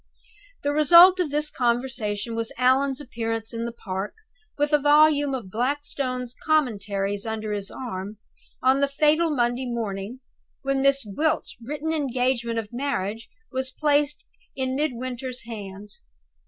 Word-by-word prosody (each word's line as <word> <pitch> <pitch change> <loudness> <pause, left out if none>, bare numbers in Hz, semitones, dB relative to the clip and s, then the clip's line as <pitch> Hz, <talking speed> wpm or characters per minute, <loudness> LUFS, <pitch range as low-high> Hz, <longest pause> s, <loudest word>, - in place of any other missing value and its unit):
The 285 - +1
result 340 +5 +8
of 350 -4 +1
this 300 +1 0
conversation 240 -3 -1
was 230 0 -2
Allan's 265 +2 +3
appearance 225 -4 -3
in 230 0 -3
the 235 - -3
park, 195 -3 -5 0.4
with 295 +1 0
a 295 - +6
volume 290 -1 +4
of 215 -8 -7
Blackstone's 255 0 -2
Commentaries 205 -9 0
under 220 -1 -3
his 200 -1 -3
arm, 210 -4 -6 0.5
on 260 +1 +4
the 280 - +3
fatal 305 +4 +3
Monday 245 -2 0
morning, 225 -1 -4 0.4
when 275 0 0
Miss 275 -2 +3
Gwilt's 300 +10 -1
written 300 +6 -3
engagement 250 -5 0
of 225 0 -4
marriage 230 -5 -3 0.2
was 260 -1 -1
placed 295 - +1 0.3
in 260 -1 -2
Midwinter's 255 -2 -3
hands. 205 -3 -8
255 Hz, 135 wpm, -25 LUFS, 225-285 Hz, 0.5 s, result